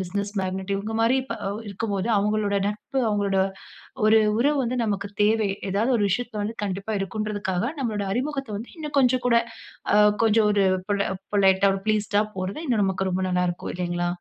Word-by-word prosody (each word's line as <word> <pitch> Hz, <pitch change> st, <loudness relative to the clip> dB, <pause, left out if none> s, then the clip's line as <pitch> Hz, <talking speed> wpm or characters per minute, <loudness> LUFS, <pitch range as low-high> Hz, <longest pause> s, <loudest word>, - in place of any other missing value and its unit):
Business 200 Hz, +3 st, -3 dB
magnet 190 Hz, +1 st, -2 dB
இவங்க 215 Hz, +3 st, -4 dB
மாரி 255 Hz, +4 st, +3 dB
இப்ப 230 Hz, -3 st, -5 dB
அவ் 210 Hz, +3 st, -4 dB
இருக்கும்போது 200 Hz, +1 st, -2 dB
அவங்களோட 210 Hz, 0 st, 0 dB
நட்பு, 210 Hz, +6 st, -4 dB
அவங்களோட 200 Hz, -2 st, +1 dB, 0.7 s
ஒரு 220 Hz, +1 st, +6 dB, 0.2 s
உறவு 290 Hz, +3 st, +3 dB
வந்து 250 Hz, +1 st, -2 dB
நமக்கு 200 Hz, -1 st, -2 dB, 0.2 s
தேவை. 215 Hz, -1 st, +2 dB, 0.2 s
ஏதாவது 220 Hz, +6 st, +1 dB
ஒரு 205 Hz, -, +2 dB
விஷயத்தில 225 Hz, 0 st, -2 dB
வந்து 225 Hz, +2 st, -4 dB
கண்டிப்பா 195 Hz, +2 st, -4 dB
இருக்கும்ன்றதுக்காக 205 Hz, -1 st, -2 dB, 0.2 s
நம்மளோட 215 Hz, -4 st, -1 dB
அறிமுகத்த 270 Hz, 0 st, -2 dB
வந்து 230 Hz, -, -8 dB
இன்னும் 300 Hz, -2 st, -4 dB
கொஞ்சம் 255 Hz, -1 st, +2 dB
கூட, 235 Hz, -, +4 dB, 0.6 s
ஆ -, -, +5 dB, 0.3 s
கொஞ்சம் 225 Hz, 0 st, +4 dB
ஒரு 200 Hz, -1 st, +3 dB, 0.3 s
பொல 200 Hz, -1 st, +1 dB, 0.3 s
பொலைட்டா 195 Hz, -1 st, +4 dB
ஒரு 195 Hz, -, -6 dB
ப்ளீஸ்ட்டா 210 Hz, -1 st, +2 dB
போறது 185 Hz, +9 st, -4 dB
இன்னும் 235 Hz, -6 st, +1 dB
நமக்கு 190 Hz, 0 st, 0 dB
ரொம்ப 185 Hz, +1 st, -1 dB
நல்லாருக்கும், 180 Hz, -1 st, -1 dB
இல்லைங்களா? 175 Hz, -1 st, -1 dB
205 Hz, 170 wpm, -24 LUFS, 195-225 Hz, 0.7 s, ஒரு